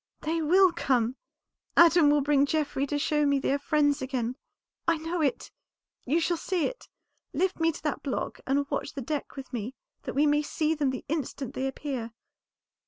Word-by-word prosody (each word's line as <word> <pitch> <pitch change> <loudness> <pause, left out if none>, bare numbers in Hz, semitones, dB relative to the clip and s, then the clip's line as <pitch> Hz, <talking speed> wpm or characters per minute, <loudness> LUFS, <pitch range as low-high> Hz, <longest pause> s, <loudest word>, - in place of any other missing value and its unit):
"They 325 +2 -1
will 365 +4 +5
come! 250 -6 +1 0.6
Adam 335 -3 +7
will 295 0 +4
bring 285 0 +3
Geoffrey 285 -2 0
to 290 - -1
show 300 0 +1
me 280 -1 +3
they 275 - 0
are 285 - 0
friends 290 0 +2
again. 255 -2 -2 0.5
I 335 -1 +3
know 325 +2 -3
it; 280 -4 -1 0.5
you 300 +7 +2
shall 340 +1 0
see 355 -1 -1
it. - - -5 0.5
Lift 375 0 0
me 325 0 +3
to 315 - -11
that 300 -3 -2
block 275 - -3
and 280 +1 +1
watch - - -2
the 275 - -3
deck 295 +3 -4
with 270 -2 -9
me 240 +2 -4 0.3
that - - -6
we 290 +2 +4
may 295 0 +3
see 310 +1 0
them 295 -3 0
the 260 -1 -5
instant 280 -3 -3
they 265 -2 -2
appear." 260 -4 -4
290 Hz, 190 wpm, -28 LUFS, 270-320 Hz, 0.6 s, Adam